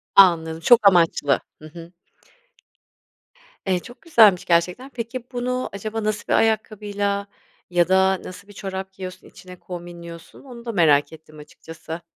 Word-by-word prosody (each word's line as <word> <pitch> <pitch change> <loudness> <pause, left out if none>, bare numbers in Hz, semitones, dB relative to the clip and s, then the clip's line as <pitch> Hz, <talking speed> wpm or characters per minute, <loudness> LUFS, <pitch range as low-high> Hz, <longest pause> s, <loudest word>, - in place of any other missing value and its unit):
Anladım. 165 -4 +5
Çok 220 +4 +5
amaçlı. 165 -6 +3 0.2
Hı - - -11
hı. 170 +1 -12 1.7
Eee, 185 -2 +1
çok 245 +7 -14
güzelmiş 220 - +5
gerçekten. 180 +10 +1
Peki, 240 0 -6
bunu 250 +1 -2
acaba 215 +2 -4
nasıl 215 -1 -2
bir - - +1
ayakkabıyla 205 -2 0 0.4
ya 175 -1 +2
da 190 0 +3
nasıl 185 +2 -10
bir 205 - -14
çorap 190 -1 -6
giyiyorsun 185 -1 -9
içine 180 0 -13
kombinliyorsun? 170 0 -10
Onu 240 -3 -12
da 230 - -3
merak 150 -6 +3
ettim 155 -1 -15
açıkçası. 160 +2 -10
190 Hz, 140 wpm, -22 LUFS, 170-215 Hz, 1.7 s, Anladım